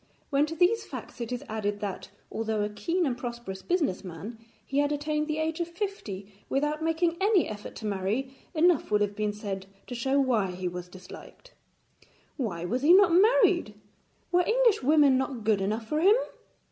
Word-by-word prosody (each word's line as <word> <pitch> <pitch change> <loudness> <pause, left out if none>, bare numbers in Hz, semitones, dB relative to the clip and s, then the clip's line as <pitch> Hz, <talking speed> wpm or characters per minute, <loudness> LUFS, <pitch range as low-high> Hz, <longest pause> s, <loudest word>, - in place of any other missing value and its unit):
When 285 +2 +3
to 325 - -5
these 370 +7 +3
facts - - -9
it 235 0 -4
is 245 - -3
added 205 -2 -2
that, 200 -2 -5 0.2
although 220 -1 -1
a 210 - -1
keen 330 - -1
and 260 -4 0
prosperous 235 -6 -6
business 315 - 0
man, 195 +6 -8 0.3
he 275 - -1
had 290 0 +2
attained 300 +1 -1
the 305 -1 -2
age 315 +1 -1
of 340 - -1
fifty 335 - -5 0.2
without 295 +3 0
making 330 +1 +1
any 400 -3 +3
effort 210 -1 -8
to 220 - -7
marry, 210 +7 -2 0.2
enough 335 -1 +3
will 210 - +4
have 205 0 0
been 210 0 0
said 200 -2 -5 0.2
to - - -7
show 265 +3 +1
why 235 -8 +2
he 180 0 -4
was 180 0 -5
disliked. 185 - -13 0.8
Why 180 - -3
was 245 +8 -1
he 310 +5 +6
not 390 -3 +6
married? 385 - +4 0.6
Were 355 0 +4
English 465 0 +3
women 285 -1 +5
not 265 -3 -3
good 210 -2 +2
enough 215 +4 -1
for 305 +7 -1
him? 400 +5 +6
260 Hz, 185 wpm, -28 LUFS, 210-325 Hz, 0.8 s, he